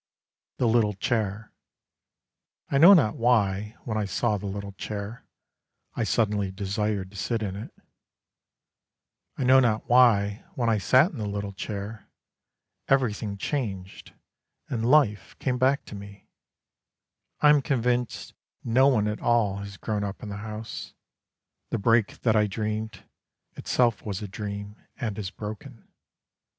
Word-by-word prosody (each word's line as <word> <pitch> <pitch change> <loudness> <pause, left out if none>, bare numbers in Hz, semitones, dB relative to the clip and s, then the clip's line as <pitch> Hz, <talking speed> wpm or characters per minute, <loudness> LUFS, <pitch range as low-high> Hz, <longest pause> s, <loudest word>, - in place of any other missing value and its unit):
THE 125 - +2
LITTLE 110 -3 +2
CHAIR 110 -1 -2 1.2
I 140 - +3
know 180 +6 +10
not 115 - +2
why, 105 -3 +1
when 110 -2 -2
I 105 - -1
saw 105 +3 0
the 100 - -5
little 100 0 -5
chair, 105 +3 -7 0.7
I - - -1
suddenly 105 -3 +1
desired 100 0 -2
to - - -16
sit 115 +2 -1
in 95 -2 -3
it. 105 - -7 1.7
I - - -1
know 130 +1 +6
not 115 -4 +1
why, 115 -5 +4
when 120 -2 0
I 110 -2 +2
sat 130 - +4
in 145 - -8
the 105 - -2
little 100 0 -4
chair, 100 +2 -6 0.8
Everything 110 -6 +1
changed, 100 -6 -4 0.6
and 115 -1 -1
life 130 -8 +3
came 125 -2 -1
back 135 +2 +2
to - - -10
me. 100 0 -11 1.1
I 150 - +7
am 150 -1 +4
convinced 125 -2 -1 0.3
no 130 +4 +4
one 110 -6 +3
at 105 0 -3
all 115 -5 +2
has 100 0 -8
grown 105 -1 -2
up 100 +4 -5
in 105 - -6
the 100 - -5
house, 110 +1 -7 0.7
The - - -1
break 115 0 +2
that 115 -3 +2
I 105 -1 +4
dreamed, 110 +2 -4 0.5
itself 120 -3 +1
was 100 -1 -4
a - - -4
dream 100 0 -6 0.2
and 110 -3 -3
is 95 -3 -3
broken. 110 +5 -9
110 Hz, 145 wpm, -26 LUFS, 100-120 Hz, 1.7 s, know